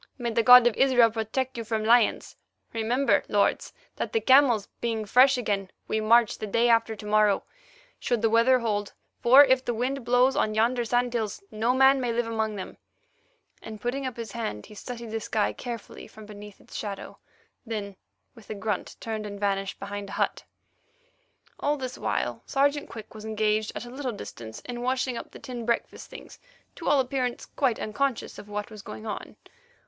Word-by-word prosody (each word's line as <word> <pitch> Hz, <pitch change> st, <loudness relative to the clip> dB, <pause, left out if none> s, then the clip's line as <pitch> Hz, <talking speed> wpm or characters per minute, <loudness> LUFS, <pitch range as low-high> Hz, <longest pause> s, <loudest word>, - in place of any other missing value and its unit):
"May 240 Hz, -2 st, -2 dB
the 230 Hz, +1 st, +2 dB
God 250 Hz, +1 st, +9 dB
of 240 Hz, -3 st, +3 dB
Israel 245 Hz, -4 st, +5 dB
protect 235 Hz, +4 st, -3 dB
you -, -, -3 dB
from 220 Hz, 0 st, -2 dB
lions. 230 Hz, +1 st, +3 dB, 0.4 s
Remember, 235 Hz, +5 st, +2 dB
lords, -, -, +1 dB, 0.3 s
that, -, -, -4 dB
the 450 Hz, -, +3 dB
camels 260 Hz, -, +4 dB
being 225 Hz, -2 st, -2 dB
fresh 255 Hz, +5 st, +5 dB
again, 200 Hz, -5 st, -2 dB, 0.2 s
we 220 Hz, -, -1 dB
march 230 Hz, +1 st, +4 dB
the 215 Hz, -, -4 dB
day 230 Hz, +4 st, +2 dB
after 230 Hz, -1 st, +3 dB
to 210 Hz, -, -11 dB
morrow, 210 Hz, -1 st, +3 dB, 0.6 s
should 240 Hz, -3 st, -1 dB
the 225 Hz, -, +4 dB
weather 230 Hz, +3 st, +5 dB
hold, 210 Hz, -4 st, -2 dB, 0.3 s
for 260 Hz, +4 st, +8 dB
if 260 Hz, -1 st, +3 dB
the 240 Hz, -, -2 dB
wind 255 Hz, +3 st, -2 dB
blows 250 Hz, +2 st, +3 dB
on 215 Hz, 0 st, 0 dB
yonder 240 Hz, +3 st, +2 dB
sand 245 Hz, +1 st, 0 dB
hills, 220 Hz, -4 st, -3 dB
no 225 Hz, +4 st, 0 dB
man 265 Hz, 0 st, +5 dB
may 245 Hz, -2 st, -1 dB
live 235 Hz, +1 st, 0 dB
among 220 Hz, -1 st, -2 dB
them;" 190 Hz, -, -7 dB, 0.8 s
and, 215 Hz, -1 st, -9 dB
putting 260 Hz, +4 st, -2 dB
up 250 Hz, -, -7 dB
his 230 Hz, -3 st, -6 dB
hand, 215 Hz, -, -4 dB
he -, -, -14 dB
studied 235 Hz, +1 st, -8 dB
the 225 Hz, -, -2 dB
sky 215 Hz, -1 st, -1 dB
carefully 235 Hz, -3 st, -8 dB
from 215 Hz, -1 st, -13 dB
beneath 210 Hz, -1 st, -11 dB
its -, -, -15 dB
shadow, 200 Hz, -2 st, -6 dB, 0.4 s
then, 210 Hz, -4 st, -5 dB, 0.4 s
with 225 Hz, -5 st, -17 dB
a 215 Hz, -, -4 dB
grunt, 205 Hz, -1 st, -3 dB
turned 220 Hz, -2 st, -4 dB
and 200 Hz, -1 st, -8 dB
vanished 195 Hz, -1 st, -1 dB
behind 200 Hz, 0 st, -6 dB
a -, -, -8 dB
hut. -, -, -1 dB, 1.2 s
All 295 Hz, +1 st, 0 dB
this 255 Hz, -2 st, -6 dB
while -, -, -2 dB
Sergeant 285 Hz, +1 st, +1 dB
Quick 220 Hz, -2 st, -10 dB
was 215 Hz, -1 st, -10 dB
engaged 215 Hz, 0 st, 0 dB
at -, -, -5 dB
a 240 Hz, -, -10 dB
little 260 Hz, -1 st, -4 dB
distance 110 Hz, -, -9 dB
in 240 Hz, -1 st, -6 dB
washing 255 Hz, 0 st, -1 dB
up -, -, -7 dB
the -, -, -12 dB
tin 245 Hz, -2 st, -7 dB
breakfast 235 Hz, +1 st, -2 dB
things, -, -, -12 dB, 0.4 s
to 330 Hz, -, -3 dB
all 290 Hz, -1 st, +4 dB
appearance 255 Hz, -2 st, -2 dB
quite 260 Hz, -6 st, -1 dB
unconscious 255 Hz, +3 st, -2 dB
of 210 Hz, -, -12 dB
what 210 Hz, +2 st, -5 dB
was 215 Hz, -1 st, -9 dB
going 215 Hz, -, -9 dB
on. 215 Hz, -, -6 dB
230 Hz, 190 wpm, -26 LUFS, 215-250 Hz, 1.2 s, God